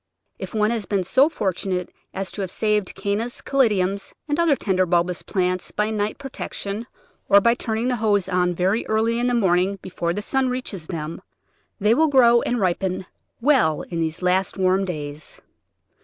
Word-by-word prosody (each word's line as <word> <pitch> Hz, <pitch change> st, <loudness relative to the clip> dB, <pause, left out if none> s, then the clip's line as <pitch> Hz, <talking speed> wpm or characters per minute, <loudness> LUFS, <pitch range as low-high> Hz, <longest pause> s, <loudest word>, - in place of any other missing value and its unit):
If -, -, -7 dB
one 215 Hz, +1 st, +2 dB
has 225 Hz, -4 st, -3 dB
been 200 Hz, -2 st, 0 dB
so 265 Hz, -, +4 dB
fortunate 185 Hz, -, -2 dB, 0.2 s
as 195 Hz, 0 st, -4 dB
to 205 Hz, -, -5 dB
have 190 Hz, -, -3 dB
saved 210 Hz, 0 st, 0 dB
Cannas, 215 Hz, +4 st, -2 dB
Caladiums, 200 Hz, -7 st, +1 dB
and 295 Hz, +1 st, -1 dB
other 335 Hz, -4 st, +4 dB
tender 185 Hz, -6 st, 0 dB
bulbous 175 Hz, 0 st, +1 dB
plants 185 Hz, -2 st, -1 dB
by 210 Hz, +1 st, -1 dB
night 210 Hz, 0 st, -1 dB
protection 235 Hz, -5 st, -5 dB, 0.4 s
or 200 Hz, -, +8 dB
by 235 Hz, +3 st, +4 dB
turning 225 Hz, 0 st, -2 dB
the 250 Hz, -1 st, 0 dB
hose 205 Hz, -4 st, +1 dB
on 180 Hz, -1 st, +1 dB
very 190 Hz, +6 st, +1 dB
early 225 Hz, +2 st, +1 dB
in 245 Hz, -, +1 dB
the 245 Hz, -, +1 dB
morning 190 Hz, -2 st, +2 dB
before 170 Hz, -2 st, -3 dB
the 205 Hz, -, -3 dB
sun 265 Hz, +2 st, +1 dB
reaches 225 Hz, -10 st, -5 dB
them, 160 Hz, -2 st, -5 dB, 0.6 s
they 210 Hz, +2 st, +4 dB
will 315 Hz, +6 st, +4 dB
grow 240 Hz, -4 st, +5 dB
and 245 Hz, -, -1 dB
ripen 185 Hz, 0 st, -1 dB, 0.4 s
well 235 Hz, -, +3 dB
in 170 Hz, -, -5 dB
these 165 Hz, +2 st, -2 dB
last 185 Hz, +2 st, +1 dB
warm 190 Hz, +1 st, +2 dB
days. 150 Hz, -4 st, -7 dB
200 Hz, 175 wpm, -23 LUFS, 180-235 Hz, 0.6 s, or